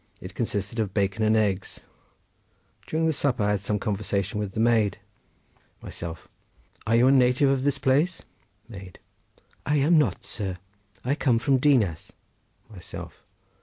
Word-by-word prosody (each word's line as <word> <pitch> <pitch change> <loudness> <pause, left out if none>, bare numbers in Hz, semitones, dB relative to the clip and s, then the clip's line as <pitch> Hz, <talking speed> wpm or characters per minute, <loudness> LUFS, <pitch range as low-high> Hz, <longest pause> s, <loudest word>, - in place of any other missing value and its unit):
It 90 -2 -9
consisted 105 0 -3
of 100 -3 -2
bacon 100 +1 0
and 110 +1 +3
eggs. 100 -3 -1 1.1
During 160 +1 +1
supper 135 -7 0
I 105 - +2
had 105 - 0
some 105 +2 -2
conversation 100 0 -2
with 100 -2 -4
the - - -4
maid. 110 -4 +2 0.9
Myself.—Are 85 +6 -7
you 120 +2 +5
a 130 - +6
native 130 +1 +4
of 135 -1 +1
this 140 +1 +1
place? 145 +8 +1 0.4
Maid.—I 100 +7 -8
am 155 +3 +4
not, 150 - 0
sir; 95 -5 -4 0.5
I 130 - +1
come 130 -5 +2
from 130 +3 +2
Dinas. 115 - +1 0.5
Myself. 100 -5 -10
110 Hz, 135 wpm, -25 LUFS, 100-135 Hz, 1.1 s, a